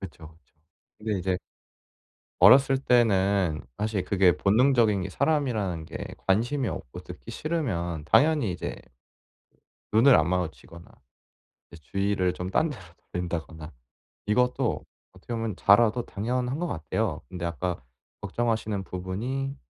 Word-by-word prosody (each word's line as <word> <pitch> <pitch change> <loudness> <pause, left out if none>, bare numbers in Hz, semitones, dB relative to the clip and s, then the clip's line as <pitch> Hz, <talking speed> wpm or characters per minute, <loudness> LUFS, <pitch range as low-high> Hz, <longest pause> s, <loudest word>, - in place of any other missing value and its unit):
그쵸, 80 -4 -10
그쵸. 75 - -41 0.4
근데 105 -2 -2
이제 95 0 -1 1.0
어렸을 135 0 +7
때는 100 - +2 0.2
사실 105 -3 -1
그게 90 -2 +3
본능적인 110 -1 +3
게 95 - -5
사람이라는 110 - 0
게 - - -7 0.3
관심이 120 +7 +1
없고 - - -6
듣기 - - -10
싫으면 85 - -2
당연히 150 -8 +4
이제 90 - -5 1.2
눈을 120 +5 +7
안 80 -2 +3
마주치거나 85 -1 -4 0.9
이제 85 - -13
주의를 100 -1 0
좀 90 +1 -5
딴 155 +10 +1
데로 125 - -8 0.3
돌린다거나 80 -2 -5 0.5
이것도 125 +4 +1 0.3
어떻게 95 +6 -8
보면 115 -4 -3
자라도 115 +3 +4
당연한 125 +6 -2
것 175 - -1
같아요. 80 - -2
근데 85 +3 -6
아까 85 -2 -3 0.4
걱정하시는 110 -4 -2
부분이 120 +11 -4
100 Hz, 290 characters per minute, -26 LUFS, 90-125 Hz, 1.2 s, 어렸을